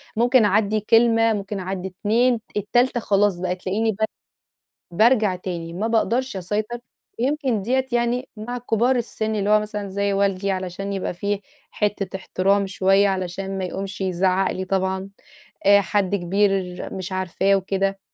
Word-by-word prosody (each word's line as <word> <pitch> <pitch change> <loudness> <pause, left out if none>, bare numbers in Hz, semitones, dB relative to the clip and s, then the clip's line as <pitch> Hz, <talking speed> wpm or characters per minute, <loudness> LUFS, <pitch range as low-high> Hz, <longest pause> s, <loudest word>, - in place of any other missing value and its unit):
ممكن 240 +1 +4
أعدي 210 +1 +2
كلمة 225 +1 +4
ممكن 200 -1 -4
أعدي 190 0 -4
2 225 +6 +1 0.2
التالتة 240 +5 +2
خلاص 205 -3 +2
بقى 180 0 -1
تلاقيني 200 +5 -1
ب - - -7 1.0
بارجع 215 0 +3
تاني 175 -2 -5
ما 195 +6 -2
باقدرش 230 +1 0
أسيطر، 210 +6 -3 0.4
ويمكن 260 -4 0
ديَّة 260 +5 0
يعني 240 +2 0
مع 240 +4 -5
كبار 245 +2 +1
السن 220 -2 -2
اللي 205 0 0
هو 215 0 +5
مثلًا 210 -1 -5
زي 200 +1 -1
والدي 195 0 +1
علشان 190 +1 -3
يبقى 195 -2 -3
في 200 +3 -2 0.3
حتة 200 -2 -2
احترام 195 +1 +1
شوية، 195 +1 +3
علشان 190 +1 -3
ما 190 - -2
يقمش 195 +2 -5
يزعق 185 0 +1
لي 190 - -4
طبعًا، 190 0 -1 0.6
آآ، 200 0 +7
حد 200 0 0
كبير 200 +2 +2 0.4
مش 190 0 -5
عارفاه 185 +1 +1
وكده. 195 0 -1
200 Hz, 150 wpm, -22 LUFS, 190-220 Hz, 1.0 s, آآ